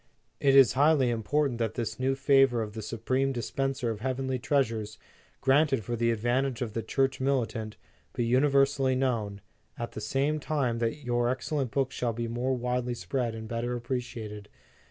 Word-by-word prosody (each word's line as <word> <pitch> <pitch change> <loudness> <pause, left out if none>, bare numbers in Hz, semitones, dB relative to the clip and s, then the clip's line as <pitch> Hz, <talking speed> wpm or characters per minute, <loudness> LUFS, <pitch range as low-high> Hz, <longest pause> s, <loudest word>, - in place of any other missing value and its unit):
It 135 -1 +4
is 135 -4 +7
highly 140 -2 +4
important 120 +3 0
that 115 -1 -1
this 120 +1 -3
new 135 +1 +1
favor 135 -3 +4
of 105 -1 -7
the 110 - -5
supreme 125 +5 -1
dispenser 135 0 -2
of 110 - -5
heavenly 130 +1 -2
treasures, 115 -6 0 0.4
granted 135 -3 +3
for 120 +4 -3
the 115 0 +1
advantage 120 +3 0
of 110 -3 -5
the 115 - -2
Church 135 +2 0
mili 130 -3 +1
tant, 110 -2 -7 0.4
be 120 - -1
universally 135 +1 +3
known, 115 -6 -1 0.4
at 120 - -4
the 110 - -7
same 145 +6 0
time 135 -6 -1
that 115 +5 -2
your 120 -1 +1
excellent 130 +1 -1
book 135 +1 0
shall 120 -3 -2
be 115 +1 -3
more 125 +3 -1
widely 125 0 -1
spread 120 -2 -2
and 110 0 -7
better 120 +2 -2
appreciated. 115 -4 -5
125 Hz, 175 wpm, -28 LUFS, 115-135 Hz, 0.4 s, is